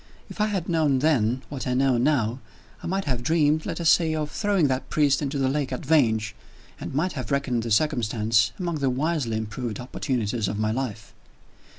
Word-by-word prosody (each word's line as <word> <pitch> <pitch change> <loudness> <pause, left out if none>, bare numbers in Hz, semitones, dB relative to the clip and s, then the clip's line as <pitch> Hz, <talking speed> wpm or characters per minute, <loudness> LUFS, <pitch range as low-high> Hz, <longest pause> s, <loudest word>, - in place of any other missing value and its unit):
If - - -5
I 210 - +3
had 195 -5 -2
known 155 -5 +2
then, 130 -4 +1
what 135 -2 -5
I 125 - 0
know 135 0 +3
now, 125 -3 +1 0.4
I - - -6
might 195 +2 -1
have 125 -4 -1
dreamed, 155 +2 +2
let - - -4
us 165 -1 +4
say, 160 -2 +3
of 150 -1 -3
throwing 200 -7 +1
that 130 0 -2
priest 145 -2 +2
into 140 0 -2
the 135 -1 +1
lake 135 0 -1
at 130 +4 -4
Vange, 110 -8 +2 0.5
and - - -6
might 175 +6 +1
have 130 -7 -5
reckoned 140 -4 0
the 115 - -4
circumstance 110 -4 +2
among 170 -4 -3
the 135 -1 +1
wisely 135 -3 -1
improved 110 +1 -4
opportunities 120 -4 -2
of 105 - -3
my 110 0 0
life. 115 -4 -4
135 Hz, 200 wpm, -25 LUFS, 115-155 Hz, 0.5 s, us